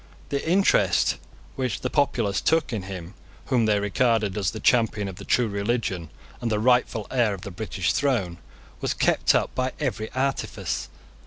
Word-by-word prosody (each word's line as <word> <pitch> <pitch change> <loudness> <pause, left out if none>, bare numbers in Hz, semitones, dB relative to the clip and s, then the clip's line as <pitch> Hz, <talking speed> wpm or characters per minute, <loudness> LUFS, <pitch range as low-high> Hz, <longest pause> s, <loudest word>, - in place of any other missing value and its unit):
The 140 -1 -1
interest 170 - +3 0.4
which 130 -2 -2
the - - -1
populace 115 -9 +1
took 160 -5 +2
in 110 - -1
him 95 -1 -7 0.4
whom 115 -3 +3
they 105 -1 +3
regarded 105 0 +1
as 100 -4 0
the 110 - -6
champion 110 -4 +2
of 95 -2 -7
the - - -9
true 125 -2 +2
religion, 100 -5 -2 0.3
and 120 -2 -1
the 105 - +2
rightful 120 -2 +2
heir 120 -6 +2
of 95 - -12
the 100 - -7
British 95 -1 -2
throne, 115 -12 0 0.4
was - - -1
kept - - +3
up - - +1
by 130 0 -1
every 120 -7 -2
artifice. 135 +1 -2
110 Hz, 170 wpm, -25 LUFS, 100-125 Hz, 0.4 s, interest